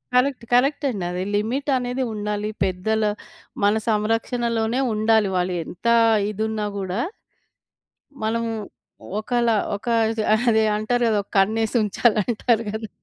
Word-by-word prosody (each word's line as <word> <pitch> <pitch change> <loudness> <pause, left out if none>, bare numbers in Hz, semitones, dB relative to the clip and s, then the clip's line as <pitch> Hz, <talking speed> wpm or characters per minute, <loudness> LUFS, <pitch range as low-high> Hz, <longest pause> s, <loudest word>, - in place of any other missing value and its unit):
Correct 250 -1 +2
కరెక్టండి. 260 -5 +2
అది 180 +1 -3
limit 250 +8 -1
అనేది 250 +1 -2
ఉండాలి. 210 0 -3
పెద్దల 195 +4 0 0.6
మన 205 +1 +5 0.2
సంరక్షణలోనే 225 +2 0
ఉండాలి 215 -1 +3
వాళ్ళు 180 0 0
ఎంత 195 +6 -6 0.4
ఇదున్నా 215 0 -2
గూడా 190 +3 -2 1.2
మనము 230 +1 -1 0.7
ఒకలా 235 0 +1 0.2
ఒక 205 +4 -10 0.6
అదే, 220 -1 +3
అంటారు 240 +3 0
గదా! 215 -2 +2
ఒక - - -42
కన్నేసి 220 +4 +2
ఉంచాలి 215 +2 +2
అంటారు 230 0 +1
గదా! 220 +1 -4
220 Hz, 115 wpm, -23 LUFS, 210-240 Hz, 1.2 s, మన